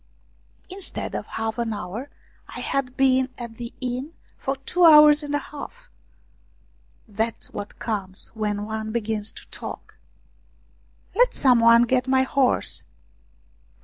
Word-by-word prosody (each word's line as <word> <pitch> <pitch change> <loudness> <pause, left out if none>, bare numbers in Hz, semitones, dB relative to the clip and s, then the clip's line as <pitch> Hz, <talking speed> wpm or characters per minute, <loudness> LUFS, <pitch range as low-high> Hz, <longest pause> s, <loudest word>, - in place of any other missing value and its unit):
Instead 380 0 -3
of - - -4
half 225 +1 -3
an 230 -2 -1
hour, 210 +7 -6 0.4
I - - -8
had 260 -2 -2
been 260 -1 +3
at 235 -2 -8
the 235 -1 -6
inn 255 +4 -4 0.2
for 270 - -3
two 315 +7 -1
hours 300 -2 +8
and 290 -1 -3
a - - +3
half! 470 - -9 1.2
That's 220 +2 -3
what 205 0 -7
comes 195 -4 -4
when 210 -2 -3
one 220 0 -4
begins 220 -2 -2
to - - -12
talk. - - -9 0.6
" - - -35
Let - - +3
some 255 -4 +4
one 230 +1 +7
get 255 +1 +1
my 260 0 +3
horse 265 -1 +1
245 Hz, 140 wpm, -24 LUFS, 220-275 Hz, 1.2 s, hours